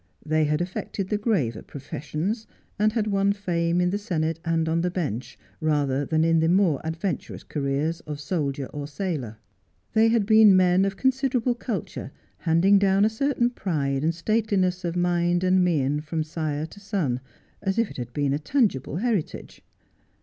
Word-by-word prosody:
They 155 0 +2
had 150 +2 0
affected 185 +2 -4
the 210 - 0
graver 170 - 0
professions, 155 - -4 0.3
and 215 +1 +3
had 225 -3 0
won 200 -1 +2
fame 175 -3 0
in 180 0 +2
the 205 - -1
Senate 165 -6 -2
and 165 -1 0
on 165 +1 +1
the 180 - 0
Bench, 150 - -4 0.2
rather 145 -3 +1
than 160 0 +2
in 165 0 +3
the 160 +1 +2
more 175 -6 +3
adventurous 165 +1 -4
careers 145 +3 -2
of 150 -1 -5
soldier 145 -4 -2
or 145 -1 -5
sailor. 145 - -4 0.6
They 220 +1 +5
had 225 -2 +2
been 215 -2 +7
men 185 +1 +4
of 195 -1 -2
considerable 260 -1 +1
culture, 210 - -5 0.3
handing 180 +4 +4
down 195 +1 +3
a - - +3
certain 245 0 +1
pride 145 - -1
and 165 +1 +1
stateliness 190 -1 0
of 170 -1 -2
mind 175 0 +1
and 185 0 +4
mien 150 -4 +1
from 160 +1 -2
sire 155 -1 -3
to 165 +5 -13
son, 190 - -1 0.4
as 195 +2 -1
if 230 -2 +1
it - - -10
had 120 -1 -5
been 140 +1 0
a 145 - 0
tangible 155 - 0
heritage. 210 -3 -2
175 Hz, 170 wpm, -25 LUFS, 150-200 Hz, 0.6 s, been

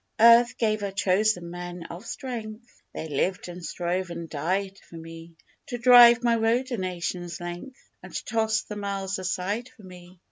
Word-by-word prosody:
Earth 235 +1 +6
gave 215 -2 0
her 200 - -2
chosen 195 -2 +1
men 175 0 -7
of 170 +3 -9
strength 230 -2 -7
(They 160 - -6
lived 180 +6 -1
and 175 0 -9
strove 180 +2 -2
and 170 -1 -6
died 190 +6 -2
for - - -12
me) 165 0 -11 0.3
To 245 - -4
drive 240 -1 +8
my 235 -1 +3
road 235 +4 +1
a 240 - -1
nation's 175 -2 -4
length, 175 +10 -8 0.2
And - - -7
toss 220 -1 0
the 210 - -8
miles 195 -1 -3
aside 190 +6 -3
for 215 - -19
me. 180 -1 -14
195 Hz, 170 wpm, -26 LUFS, 175-225 Hz, 0.3 s, drive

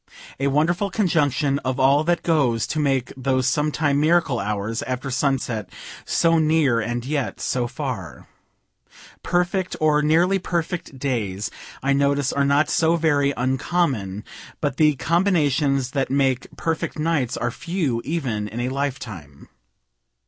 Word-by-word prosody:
A 135 - +1
wonderful 165 +8 +1
conjunction 150 - +1
of 130 0 -3
all 140 +3 +4
that 175 +1 +1
goes 135 -9 +2
to 155 - -3
make 135 -4 0
those 130 -1 0
sometime 145 +2 +1
miracle 160 -5 +2
hours 105 +1 -2
after 130 +2 -4
sunset 125 -7 -1 0.4
so 165 -1 +3
near 155 -6 +3
and 120 +2 -3
yet 140 -1 -2
so 125 -2 -1
far. 130 - -6 0.9
Perfect, 180 +1 0
or 150 -1 +3
nearly 170 +6 +3
perfect 170 -4 -3
days, 110 -7 -2 0.3
I 140 0 +2
notice, 140 0 +1
are 140 - +1
not 140 +2 +3
so 165 +2 +2
very 145 -4 +2
uncommon; 130 - -1 0.4
but 145 -3 -2
the 150 -2 +4
combinations 145 -5 +1
that 135 -1 -1
make 135 -2 +1
perfect 160 -1 -2
nights 150 -6 0
are 120 - -1
few, 155 -7 -2
even 125 -10 -2
in 110 +3 -6
a 125 +1 -1
life 140 0 -2
time. 75 - -10
140 Hz, 140 wpm, -22 LUFS, 125-160 Hz, 0.9 s, all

